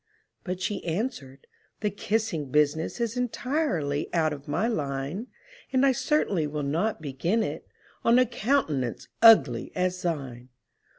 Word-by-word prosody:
But 180 -1 -4
she 200 +2 -3
answered, 160 - -4 0.4
"The 210 -1 0
kissing 200 -7 -2
business 150 - +1
Is 235 -1 -1
entirely 245 - -1
out 160 -2 +2
of 140 -1 -10
my 180 +10 0
line; 145 - -3 0.4
And 260 0 +3
I 275 - +5
certainly 225 - +1
will 150 0 -3
not 165 +6 -1
begin 165 +11 0
it - - -5 0.4
On 235 +1 +5
a 255 - +5
countenance 215 - -1
ugly 145 - +6
as 180 0 -1
thine!" 135 -7 -4
175 Hz, 135 wpm, -27 LUFS, 145-230 Hz, 0.4 s, ugly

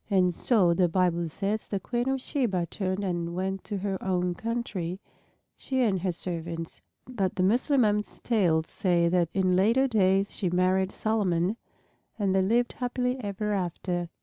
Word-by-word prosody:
And 185 -3 +3
so, 185 -4 +3
the 175 0 +2
Bible 175 -1 +1
says, 205 +6 -2
the 200 - -2
Queen 240 +5 -2
of 270 0 0
Sheba 230 -10 -1
turned 190 0 -2
and 170 -2 -2
went 190 +1 -2
to 205 - -3
her 195 -1 -3
own 180 -1 0
country, 195 -5 -3 0.6
she 260 -1 -2
and 195 -6 +1
her 185 0 0
servants. 165 -1 -5 0.3
But 200 -7 -2
the 185 - +1
Mussulmans' 215 -1 +2
tales 175 -9 +2
say 170 -2 +1
that 175 -2 +2
in 185 -1 +2
later 230 +8 +3
days 195 -4 +2
she 185 - -1
married 185 +2 +2
Solomon 195 -3 0 0.6
and 200 -3 +1
they 190 - +3
lived 235 +5 +1
happily 250 0 -1
ever 210 +1 -2
after. 175 -2 -2
190 Hz, 160 wpm, -27 LUFS, 180-215 Hz, 0.6 s, And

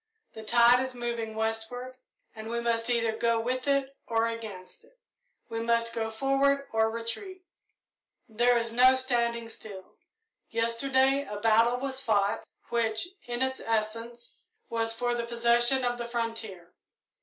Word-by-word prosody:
The 220 - -8
tide 235 +2 +5
is 260 0 -3
moving 235 -2 -3
westward, 225 +3 -3 0.4
and 220 0 -7
we 235 0 -1
must 235 0 0
either 230 -2 +2
go 230 0 +1
with 255 +3 -2
it 275 -1 +1
or 225 -1 +1
against 220 -5 -7
it. - - -24 0.5
We 225 -1 -4
must 230 0 +1
go 225 -1 -2
forward 275 +4 +1
or 225 0 +2
retreat, 360 - -5 0.8
there 240 +2 +3
is 230 -1 -1
no 255 +2 +6
standing 235 -3 0
still. 200 -4 -10 0.6
Yesterday 260 +4 +2
a 205 0 -5
battle 230 +3 +4
was 265 0 -3
fought, 205 -4 +1 0.3
which, 230 +5 0 0.2
in 240 +1 -1
its 260 0 -2
essence, 230 +2 -3 0.4
was 225 0 0
for 240 +1 -1
the 235 -1 -3
possession 235 +2 +3
of 245 0 -1
the 235 - -4
frontier. 225 -7 -5
235 Hz, 145 wpm, -28 LUFS, 225-250 Hz, 0.8 s, no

